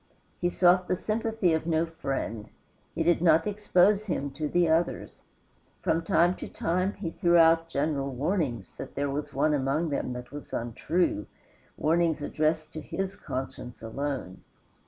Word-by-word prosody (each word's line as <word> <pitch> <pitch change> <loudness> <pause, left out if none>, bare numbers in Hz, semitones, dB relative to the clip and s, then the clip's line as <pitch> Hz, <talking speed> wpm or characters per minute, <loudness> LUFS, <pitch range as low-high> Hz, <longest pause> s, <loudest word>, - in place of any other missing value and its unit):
He 175 - +1
sought 180 +1 +4
the 185 - +1
sympathy 220 -3 0
of 160 +1 -1
no 165 0 +2
friend; 135 -9 -4 0.5
he 165 - +1
did 170 0 +3
not 165 -2 +5
expose 205 0 +3
him 145 -8 -2
to 150 +3 -3
the 175 +1 +3
others. 165 +2 0 0.6
From 165 +1 +2
time 170 +2 +3
to - - -6
time 185 +4 -1
he 180 -4 -5
threw 175 -1 +3
out 165 0 +5
general 140 -2 -1
warnings 135 - -2
that - - -8
there 140 0 -1
was 145 +2 -4
one 155 - +2
among 145 +4 0
them 140 -3 -2
that 125 0 -8
was 145 0 -9
untrue 120 - -1 0.5
warnings 165 -1 +1
addressed 155 +1 -1
to 155 - -5
his 195 +5 -4
conscience 130 -2 -6
alone. 130 -4 -4
160 Hz, 155 wpm, -28 LUFS, 140-175 Hz, 0.6 s, not